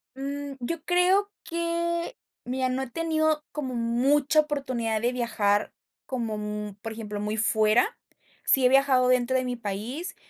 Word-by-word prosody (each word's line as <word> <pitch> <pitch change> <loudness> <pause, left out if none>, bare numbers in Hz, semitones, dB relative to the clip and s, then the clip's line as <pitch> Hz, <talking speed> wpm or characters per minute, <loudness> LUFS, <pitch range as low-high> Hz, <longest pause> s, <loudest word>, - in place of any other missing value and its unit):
Mm, 280 +1 -4
yo 310 +6 -4
creo 370 +3 +3
que, 340 0 -2 0.3
mira, 255 +1 -1
no 255 +1 -1
he 265 - -4
tenido 315 +1 +1
como 265 -4 -4
mucha 270 +6 +3
oportunidad 255 -7 -2
de 240 +1 +1
viajar, 210 -4 +1 0.3
como 230 -5 -3
mm, 210 -1 -4
por 225 0 -5
ejemplo, 210 -2 -5
muy 210 +1 -2
fuera. 220 +1 +3 0.5
Sí 265 -2 +4
he - - +7
viajado 265 -1 +4
dentro 255 +1 +3
de 255 - 0
mi 250 0 -2
país. 235 - -5
255 Hz, 150 wpm, -27 LUFS, 225-300 Hz, 0.5 s, he